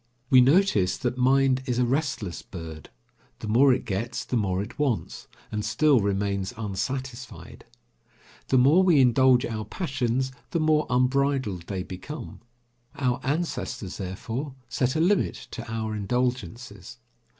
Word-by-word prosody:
We 130 Hz, -1 st, +8 dB
notice 130 Hz, -, +3 dB
that 125 Hz, -2 st, -2 dB
mind 130 Hz, +1 st, +3 dB
is 125 Hz, -2 st, 0 dB
a 125 Hz, -, +3 dB
restless 130 Hz, -, -2 dB
bird; 80 Hz, -4 st, -9 dB, 0.5 s
the -, -, -7 dB
more 130 Hz, +6 st, +5 dB
it 125 Hz, 0 st, 0 dB
gets 115 Hz, +3 st, -3 dB
the -, -, -3 dB
more 95 Hz, -5 st, 0 dB
it 115 Hz, +7 st, -11 dB
wants, 135 Hz, -7 st, -2 dB, 0.2 s
and 105 Hz, 0 st, -2 dB
still 125 Hz, +5 st, +3 dB
remains 100 Hz, +1 st, -1 dB
unsatisfied. 120 Hz, +5 st, -5 dB, 0.8 s
The 130 Hz, -, +3 dB
more 140 Hz, +8 st, +6 dB
we 175 Hz, -6 st, +5 dB
indulge 130 Hz, 0 st, +5 dB
our 110 Hz, -2 st, -4 dB
passions, 130 Hz, -, -2 dB, 0.2 s
the 170 Hz, -, -1 dB
more 155 Hz, -1 st, +2 dB
unbridled 125 Hz, -7 st, +1 dB
they 95 Hz, -2 st, -3 dB
become. 95 Hz, -, -8 dB, 0.6 s
Our 125 Hz, -3 st, 0 dB
ancestors, 135 Hz, -, -3 dB
therefore, 115 Hz, +9 st, -5 dB
set 130 Hz, 0 st, 0 dB
a -, -, +1 dB
limit 185 Hz, +4 st, +2 dB, 0.2 s
to 115 Hz, -2 st, -7 dB
our 110 Hz, -1 st, -3 dB
indulgences. 120 Hz, +2 st, -3 dB
125 Hz, 140 wpm, -26 LUFS, 105-135 Hz, 0.8 s, We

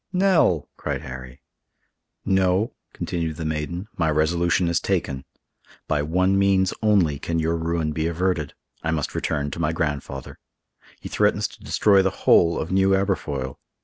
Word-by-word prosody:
"Nell!" 180 Hz, -, +3 dB
cried -, -, -3 dB
Harry. 65 Hz, 0 st, -9 dB, 0.8 s
"No," 95 Hz, +2 st, +2 dB, 0.2 s
continued 80 Hz, -3 st, -3 dB
the 80 Hz, -, -5 dB
maiden, 80 Hz, +5 st, -3 dB
"my 80 Hz, -2 st, +1 dB
resolution 85 Hz, +3 st, +2 dB
is 85 Hz, +1 st, +2 dB
taken. 75 Hz, -8 st, -2 dB, 0.6 s
By 75 Hz, -2 st, +1 dB
one 90 Hz, +6 st, +2 dB
means 95 Hz, -1 st, +3 dB
only 95 Hz, -10 st, +3 dB
can 85 Hz, +1 st, -2 dB
your 80 Hz, +1 st, +1 dB
ruin 80 Hz, -1 st, -1 dB
be 80 Hz, +1 st, -1 dB
averted; 85 Hz, -3 st, -1 dB, 0.3 s
I 80 Hz, -, -2 dB
must 75 Hz, -3 st, -1 dB
return 75 Hz, -2 st, -2 dB
to -, -, -6 dB
my 80 Hz, -1 st, 0 dB
grandfather. 75 Hz, -4 st, -4 dB, 0.6 s
He -, -, -8 dB
threatens -, -, +1 dB
to -, -, -16 dB
destroy 100 Hz, -2 st, +4 dB
the 95 Hz, -, +2 dB, 0.2 s
whole 85 Hz, 0 st, +5 dB
of 80 Hz, -, -4 dB
New 95 Hz, 0 st, +4 dB
Aberfoyle. 70 Hz, -10 st, -2 dB
85 Hz, 150 wpm, -23 LUFS, 75-95 Hz, 0.8 s, whole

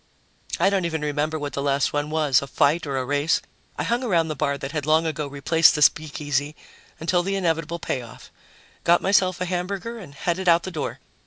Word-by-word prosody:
I 195 Hz, -, +4 dB
don't 195 Hz, -3 st, +1 dB
even 160 Hz, -2 st, -2 dB
remember 150 Hz, +1 st, -1 dB
what 145 Hz, -1 st, -5 dB
the 140 Hz, -, -2 dB
last 140 Hz, -1 st, +1 dB
one 145 Hz, 0 st, -1 dB
was, 150 Hz, -4 st, +2 dB
a 140 Hz, -, -6 dB
fight 150 Hz, +4 st, +1 dB
or 135 Hz, -1 st, -2 dB
a 130 Hz, -, -1 dB
race. 145 Hz, +4 st, +1 dB, 0.4 s
I -, -, -1 dB
hung 240 Hz, +2 st, 0 dB
around 170 Hz, -9 st, +1 dB
the 155 Hz, -, -3 dB
bar 140 Hz, -1 st, -1 dB
that 135 Hz, 0 st, -6 dB
had 150 Hz, -2 st, -3 dB
long 160 Hz, +1 st, +4 dB
ago 155 Hz, -2 st, -2 dB
replaced 150 Hz, +4 st, +3 dB
the 150 Hz, -, +3 dB
speakeasy, 145 Hz, -1 st, +1 dB, 0.4 s
until 175 Hz, +2 st, +1 dB
the 195 Hz, +2 st, -2 dB
inevitable 165 Hz, -3 st, -1 dB
payoff, 125 Hz, -7 st, -6 dB, 0.5 s
got 175 Hz, +1 st, +4 dB
myself 185 Hz, -2 st, +3 dB
a 180 Hz, -, -1 dB
hamburger 190 Hz, +6 st, -3 dB
and 155 Hz, -9 st, -12 dB
headed 180 Hz, +4 st, -1 dB
out 170 Hz, 0 st, +5 dB
the 185 Hz, -, -5 dB
door. 155 Hz, -4 st, -4 dB
155 Hz, 210 wpm, -24 LUFS, 145-175 Hz, 0.5 s, out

